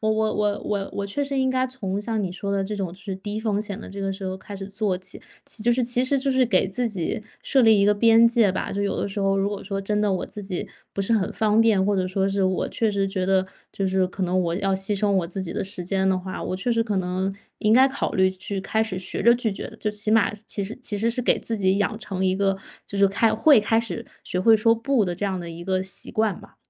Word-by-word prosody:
我 220 0 +1
我 220 0 +1
我 210 -1 0
我 200 -2 -2
我 200 0 -2
确 285 +9 -2
实 275 -1 -2
应 260 0 +2
该 260 0 +1
从 205 -7 -4
像 220 0 -2
你 180 -2 -3
说 200 +1 -4
的 200 -1 0
这 210 +2 -4
种 195 -3 -2
就 180 +3 -11
是 195 -1 -5
低 205 +2 -5
风 215 -2 0
险 205 -2 -5
的 - - -9
这 200 +1 -7
个 195 0 -1
时 195 0 -6
候 185 0 -2
开 195 +1 -9
始 195 - -6
做 200 -1 -1
起， 185 +1 -7 0.2
其 - - -3
实 - - -2
就 240 - +3
是 245 0 +2
其 245 +1 +1
实 270 +2 +1
就 270 +1 0
是 260 -1 +3
给 190 -5 +3
自 235 +6 -1
己 200 0 -3 0.2
设 270 - +3
立 225 -3 +6
一 200 - +4
个 210 - +5
边 225 +2 +6
界 230 -4 +4
吧。 185 - -3
就 200 - -2
有 200 -1 -1
的 - - -1
时 200 +1 -4
候 195 0 +2
如 195 0 +1
果 205 -1 -5
说 195 0 -4
真 210 +2 -1
的 210 -1 +2
我 185 - -1
自 210 - -7
己 190 -2 -3 0.3
不 200 - -1
是 215 +4 +1
很 205 -4 +1
方 215 0 +2
便， 210 -4 +4
或 205 0 +2
者 185 -1 0
说 190 +1 0
是 195 0 0
我 185 0 +1
确 225 -2 +1
实 200 -1 0
觉 185 -1 -2
得 190 0 +2 0.2
就 195 - -2
是 185 0 +2
可 190 +1 -6
能 185 +1 +1
我 170 -1 -1
要 195 +1 0
牺 195 +2 -1
牲 205 0 +1
我 190 -3 +1
自 190 +2 -4
己 170 - -4
的 - - -2
时 190 -2 -4
间 190 +1 +1
的 185 -1 +2
话， 185 0 -6
我 185 - -3
确 240 +5 0
实 230 0 +2
可 210 -3 -2
能 185 +1 -1 0.3
应 215 +1 +3
该 260 +2 +7
考 275 +1 -2
虑 190 0 +4
去 190 +1 -5
开 220 +3 +1
始 195 -4 -3
学 185 - -4
着 235 +1 +6
拒 235 -3 -1
绝 - - -6
的， - - -12
最 210 -1 -2
起 210 +1 -2
码 225 -2 +4
其 200 - -3
实 215 +5 -6
其 210 -4 -3
实 230 +3 +1
是 250 +2 -1
给 - - +2
自 225 -2 -2
己 190 0 +2
养 205 +1 0
成 190 -3 -3
一 185 0 +2
个 195 0 +1 0.3
就 200 - -6
是， 200 0 +5
开 210 +3 +2
会 265 +1 +6
开 225 +2 +2
始 225 -8 -3 0.2
学 180 - -2
会 220 +3 +6
说 230 +2 +4
“不” 230 -1 +1
的 175 - -2
这 205 - -2
样 190 -2 -2
的 170 -1 -6
一 165 +1 -8
个 185 0 0
习 190 - -5
惯 215 -4 0
吧。 - - -17
200 Hz, 320 characters per minute, -24 LUFS, 190-220 Hz, 0.3 s, 该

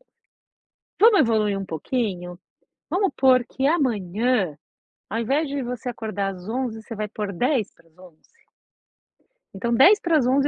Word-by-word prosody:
11h. - - -33 0.9
Vamos 430 -1 +6
evoluir 215 -4 +1
um 195 - -5
pouquinho? 180 - -3 0.5
Vamos 385 +1 +1
pôr 255 -2 +4
que 265 +1 -2
amanhã, 225 - 0 0.5
ao 225 +3 -2
invés 280 +6 0
de 280 -1 -3
você 250 +1 -5
acordar 215 -4 -3
às 180 +3 -11
11h, 235 -2 -3
você 230 - -8
vai 215 0 -3
pôr 210 -1 -5
10:50. 185 - -4 1.3
Então 235 +5 -2
10:50, 285 - +4
230 Hz, 125 wpm, -23 LUFS, 195-265 Hz, 1.3 s, Vamos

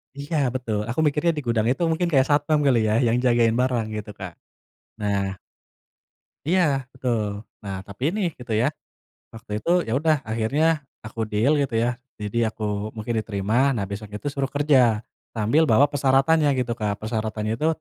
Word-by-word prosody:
Iya 145 +3 -5 0.2
betul. 115 -5 -2
Aku 120 - -2
mikirnya 150 +3 +2
di 150 - -3
gudang 115 -2 +1
itu 130 +7 0
mungkin 175 +2 0
kayak 135 -3 +4
satpam 150 +1 +3
kali 130 -4 +4
ya 105 - +2
yang 115 +1 +2
jagain 120 -2 +3
barang 125 -3 +1
gitu, 105 0 -6
Kak. 90 -3 -6 0.7
Nah 100 -2 -1 1.1
Iya 155 -6 +2
betul. 110 -6 -2 0.2
Nah, 100 -1 -4
tapi 100 +3 -12
ini 215 - -2 0.2
gitu 125 -2 -5
ya, 110 +3 +2 0.6
waktu 115 -1 -12
itu - - -3 0.2
ya 110 - -1
udah 155 0 +3
akhirnya 140 +9 +1 0.2
aku 110 +1 -9
deal 110 +7 +2
gitu 135 -5 -2
ya, 120 +1 +2 0.3
jadi 110 +2 -1
aku 105 0 -3
mungkin 110 +2 -3
diterima. 110 +6 +1
Nah, 110 -7 -1
besok 100 +1 -7
itu 105 +7 -6
suruh 140 -1 -2
kerja, 135 -7 +3 0.3
sambil 115 +8 +2
bawa 115 +6 +6
persyaratannya 145 +2 +3
gitu, 120 -2 -1
Kak. 105 -3 -2
Persyaratannya 110 0 -2
itu, 155 +7 0
120 Hz, 170 wpm, -24 LUFS, 110-140 Hz, 1.1 s, bawa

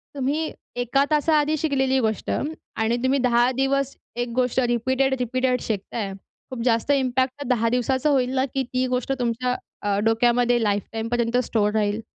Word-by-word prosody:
तुम्ही 290 +4 -1 0.2
एका 245 +3 +1
तासा 305 +1 +3
आधी 300 +1 +1
शिकलेली 265 -3 +1
गोष्ट 220 -4 -1
आणि 240 -6 -2
तुम्ही 270 +2 +2
10 245 0 +3
दिवस 270 +1 0 0.2
एक 240 0 -2
गोष्ट 255 0 +1
रिपीटेड-रिपीटेड 255 +1 +1
शिकताय. 205 -1 -3 0.4
खूप 255 -3 -5
जास्त 230 +3 +2
इम्पॅक्ट 260 -1 +1
त्या 285 - -5
10 230 0 +1
दिवसाचं 260 +4 +1
होईल 255 -3 +2
ना, 265 0 +2
की 270 0 -2
ती 255 +1 -1
गोष्ट 250 +1 -1
तुमच्या 250 +1 0 0.3
अ, 205 -1 0
डोक्यामध्ये 240 +1 +3
लाईफ 205 -1 +1
टाईम 225 0 -3
पर्यंत 240 0 +1
स्टोअर 210 -3 0
राहील. 210 +1 0
250 Hz, 165 wpm, -23 LUFS, 230-265 Hz, 0.4 s, तासा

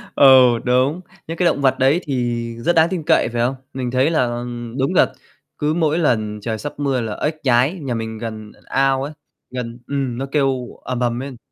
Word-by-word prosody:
Ừ, 130 -2 +8 0.2
đúng, 130 +7 +2 0.3
những 165 +1 -5
cái 180 - +1
động 145 -4 +2
vật 135 -1 +3
đấy 135 +6 +4
thì 120 -4 -1 0.2
rất 175 +9 +1
đáng 165 +1 +5
tin 180 -4 -3
cậy, 160 -7 +3
phải 120 0 -2
không? 125 +3 +1 0.2
Mình 125 -2 -3
thấy 130 +4 +2
là 155 -7 +2 0.5
đúng 135 - +1
là - - +4 0.4
cứ 150 +1 0
mỗi 160 -1 +1
lần 110 -9 0
trời 110 +1 -3
sắp 145 +6 -6
mưa 135 -3 0
là 110 -2 -4
ếch 155 +1 -2
nhái, 130 +3 +3
nhà 135 -4 -3
mình 110 -1 -4
gần 110 -2 -7
ao 135 0 +1
ấy, 145 +2 -5 0.4
gần 125 -1 -5
ừm, 135 -4 -2
nó 135 - -2
kêu 135 -4 +1 0.2
ầm 125 -1 -3
ầm 120 -1 0
lên. 135 -1 -7
130 Hz, 210 wpm, -20 LUFS, 120-145 Hz, 0.5 s, Ừ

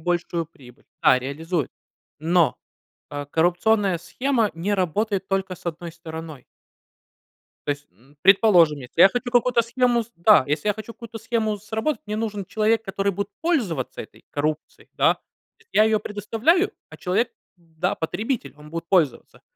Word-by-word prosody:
большую 170 -1 -1
прибыль 125 -6 -18 0.2
Да, 130 - +6
реализует. 155 +4 -3 0.5
Но, 165 +1 +2 0.5
э, 145 0 -5
коррупционная 180 +3 +2
схема 230 +5 0
не 195 +5 -1
работает 195 +2 0
только 195 -1 -1
с - - -16
одной 170 0 -5
стороной. 160 -4 -9 1.2
То - - -4
есть, 145 0 -6
м, 130 +10 -25
предположим, 180 -7 +5
если 125 +6 -1
я 195 - +9
хочу 245 +1 -3
какую-то 245 0 +4
схему, 240 0 +1
с 235 - -22
да, 170 -3 +6
если 150 +7 -1
я 205 - +3
хочу 220 +2 -9
какую-то 230 -1 -9
схему 220 -1 -1
сработать, 220 +6 -2
мне 210 - -2
нужен 210 -3 -3
человек, 220 +3 +1
который 195 -1 -1
будет 200 +2 -3
пользоваться 225 - -1
этой - - -15
коррупцией, 150 +1 -3
да. - - +3
То - - -32 0.4
есть 455 - -27
я 215 - +6
её 220 -1 +3
предоставляю, 225 - +1 0.2
а - - -12
человек, 200 +6 0 0.3
да, 170 +1 -3
потребитель, 210 - -3
он 150 0 -13
будет 165 +1 -5
пользоваться. 165 -9 +1
195 Hz, 160 wpm, -23 LUFS, 160-220 Hz, 1.2 s, я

